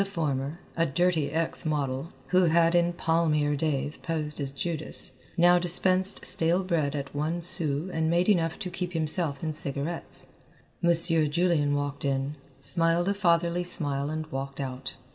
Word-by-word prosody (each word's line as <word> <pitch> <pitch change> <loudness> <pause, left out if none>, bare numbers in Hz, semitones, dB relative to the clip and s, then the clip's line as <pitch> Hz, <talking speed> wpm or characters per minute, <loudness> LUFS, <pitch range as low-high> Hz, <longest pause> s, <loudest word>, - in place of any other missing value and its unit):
The - - 0
former, 150 -5 -4 0.2
a 165 0 0
dirty 165 0 0
ex 165 +2 -3
model, 145 0 -3 0.2
who 185 0 +3
had 165 0 +2
in 175 0 +2
palmier 155 -3 0
days 145 -1 -3
posed 155 -2 -3
as 135 -1 -2
Judas, 155 +1 0 0.3
now 175 +1 +4
dispensed 185 +2 0
stale 170 +3 +3
bread 155 -6 -2
at 140 -1 -6
one 155 +4 -3
sou 170 -2 +8
and 160 0 -1
made 175 +2 +1
enough 165 -6 +1
to 185 -4 -6
keep 180 -1 -5
himself 160 -2 -3
in 155 -1 -3
cigarettes. 150 +2 -4 0.6
Monsieur 165 -2 +3
Julian 150 -2 0
walked 145 0 -4
in, 140 +1 -2 0.2
smiled 165 +4 +2
a - - +1
fatherly 175 -2 0
smile 145 -5 -2
and 155 0 -4
walked 135 +1 -6
out. 130 -1 -6
160 Hz, 160 wpm, -26 LUFS, 145-175 Hz, 0.6 s, sou